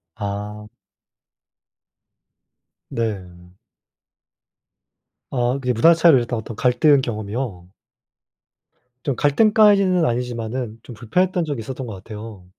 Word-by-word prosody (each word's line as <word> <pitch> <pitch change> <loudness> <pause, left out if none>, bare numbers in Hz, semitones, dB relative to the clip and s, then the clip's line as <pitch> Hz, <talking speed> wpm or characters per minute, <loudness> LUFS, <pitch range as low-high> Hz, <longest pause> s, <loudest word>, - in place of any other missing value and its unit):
아. 105 0 -5 2.2
네. 90 -6 -5 1.8
아. 120 -1 0
그게 125 -2 -1
문화 165 +10 +6
차이로 165 -4 +5
이랬던 120 -1 -2
어떤 110 0 -8
갈등 140 +3 +4
경험이요? 110 -5 -5 1.4
좀 140 - -1
갈등까지는 200 +1 +4
아니지만은 120 -1 -3
좀 120 - -11
불편했던 175 +11 0
적이 145 -5 -4
있었던 130 +3 -6
것 110 - -7
같아요. 105 0 -10
120 Hz, 220 characters per minute, -21 LUFS, 105-145 Hz, 2.2 s, 문화